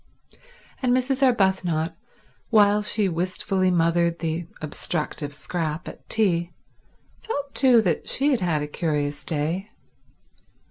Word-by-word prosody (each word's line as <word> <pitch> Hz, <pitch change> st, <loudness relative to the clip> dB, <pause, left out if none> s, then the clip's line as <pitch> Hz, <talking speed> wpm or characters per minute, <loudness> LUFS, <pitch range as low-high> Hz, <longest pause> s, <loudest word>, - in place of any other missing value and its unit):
And 250 Hz, -1 st, +3 dB
Mrs. 260 Hz, +1 st, -1 dB
Arbuthnot, 190 Hz, -9 st, +2 dB, 0.5 s
while 210 Hz, -2 st, +5 dB
she 210 Hz, -1 st, +1 dB
wistfully 185 Hz, +2 st, 0 dB
mothered 170 Hz, -1 st, +2 dB
the 165 Hz, 0 st, -3 dB
obstructive 155 Hz, -1 st, -3 dB
Scrap 155 Hz, +2 st, -3 dB
at -, -, -11 dB
tea, 175 Hz, -6 st, +2 dB, 0.7 s
felt 285 Hz, -10 st, -4 dB
too 250 Hz, -4 st, +5 dB
that 170 Hz, -6 st, -1 dB
she 285 Hz, +3 st, +2 dB
had 250 Hz, -6 st, +1 dB
had 160 Hz, -5 st, +1 dB
a -, -, -4 dB
curious 150 Hz, -2 st, -2 dB
day. 170 Hz, +5 st, -2 dB
175 Hz, 120 wpm, -24 LUFS, 160-215 Hz, 0.7 s, while